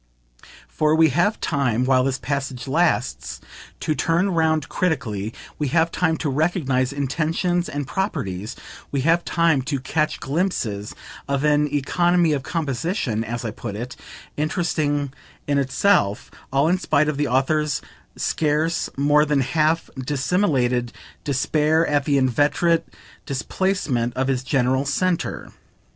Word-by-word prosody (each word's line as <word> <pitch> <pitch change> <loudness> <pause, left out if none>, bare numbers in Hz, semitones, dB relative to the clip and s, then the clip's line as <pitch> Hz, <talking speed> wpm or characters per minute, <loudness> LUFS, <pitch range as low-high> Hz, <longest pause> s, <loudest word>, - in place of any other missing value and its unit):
For 155 0 +1
we 160 0 +5
have 175 - +1
time, 130 -5 0
while 130 -1 +4
this 135 0 0
passage 135 0 -3
lasts, 150 -3 0 0.4
to 155 - 0
turn 170 +5 +1
round 160 -4 +1
critically; 110 - -1 0.3
we 150 - 0
have 165 +4 +2
time 160 -3 +1
to - - +2
recognise 135 -4 +1
intentions 165 +5 -1
and 145 0 -3
proprieties; 110 - -3 0.4
we 140 - 0
have 165 +4 +3
time 165 -5 +2
to 140 +1 -2
catch 155 +4 -1
glimpses 135 - -2 0.3
of 140 0 0
an 150 0 +3
economy 175 +3 +2
of 140 - -1
composition, 145 - -2
as 115 +1 -4
I 110 - -2
put 100 -1 -6
it, 120 +4 -6 0.4
interesting 150 -3 0 0.3
in 145 -1 +1
itself: 135 - +1 0.2
all 135 +3 +3
in 180 +2 +2
spite 155 -4 +2
of 150 -2 -1
the 145 0 +1
author's 145 +3 +1 0.4
scarce 155 +2 0
more 145 +2 +4
than 150 -2 +1
half 155 +4 +1
dissimulated 130 - +1 0.3
despair 150 +3 +2
at 145 -2 +1
the 140 -1 +2
inveterate 145 +6 +2 0.4
displacement 135 -5 -1
of 130 +1 0
his 130 -2 0
general 130 0 +1
centre. 180 +4 -1
145 Hz, 135 wpm, -22 LUFS, 130-165 Hz, 0.4 s, we